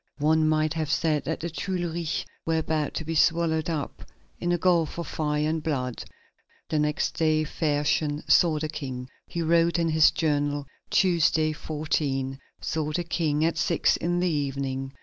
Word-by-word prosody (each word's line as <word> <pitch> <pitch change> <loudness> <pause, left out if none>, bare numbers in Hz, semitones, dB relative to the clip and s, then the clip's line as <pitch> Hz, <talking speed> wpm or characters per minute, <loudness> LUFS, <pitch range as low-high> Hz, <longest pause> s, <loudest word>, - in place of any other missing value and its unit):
One 155 +1 +3
might 155 0 +2
have 160 -2 -2
said 155 -2 +1
that 160 +4 -3
the 170 - -3
Tuileries 175 -2 -2 0.2
were 165 0 0
about 155 -2 -1
to 160 - -3
be 165 - -3
swallowed 160 0 +2
up 155 -4 -4 0.4
in 175 - -1
a 175 - +2
gulf 170 -3 +2
of 170 - -3
fire 150 -1 -1
and 160 0 -1
blood. 130 -6 -2 0.7
The 155 - +1
next 150 0 -1
day 155 -1 +3
Fersen 150 -1 0
saw 165 -3 +5
the 155 +1 -2
King. 130 -5 -6 0.2
He 170 - -3
wrote 170 +1 +3
in 165 -1 +1
his 155 -1 +6
journal: 145 -2 0 0.2
"Tuesday, 160 -3 +3
14. 145 -4 -2 0.2
Saw 155 -1 -2
the 175 - 0
King 160 -2 0
at 165 - 0
six 170 - +2
in 175 +1 -1
the 180 - +2
evening. 135 -3 -2
155 Hz, 170 wpm, -26 LUFS, 150-165 Hz, 0.7 s, his